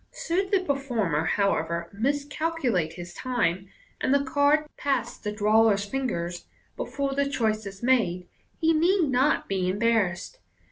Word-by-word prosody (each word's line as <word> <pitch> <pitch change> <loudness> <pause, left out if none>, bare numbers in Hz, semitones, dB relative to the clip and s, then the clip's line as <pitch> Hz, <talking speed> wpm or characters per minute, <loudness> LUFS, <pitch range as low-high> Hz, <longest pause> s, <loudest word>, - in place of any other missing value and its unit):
Should 380 +3 0
the 390 -1 +3
performer, 235 - -1
however, 170 -3 0
miscalculate 280 - -1
his 175 0 -9
time, 195 -8 -1 0.3
and - - +1
the 280 0 +3
card 285 +3 +2
pass 275 -3 -1
the 210 - -5
drawer's 210 -1 +3
fingers 180 -8 -3 0.3
before 275 -1 -3
the 280 0 0
choice 220 -6 -1
is 195 +2 -10
made, 185 -9 +1 0.3
he 325 -1 +2
need 340 0 +3
not 265 +4 +2
be 185 -2 0
embar 220 -1 +2
rassed. 175 - -9
235 Hz, 140 wpm, -26 LUFS, 190-280 Hz, 0.3 s, the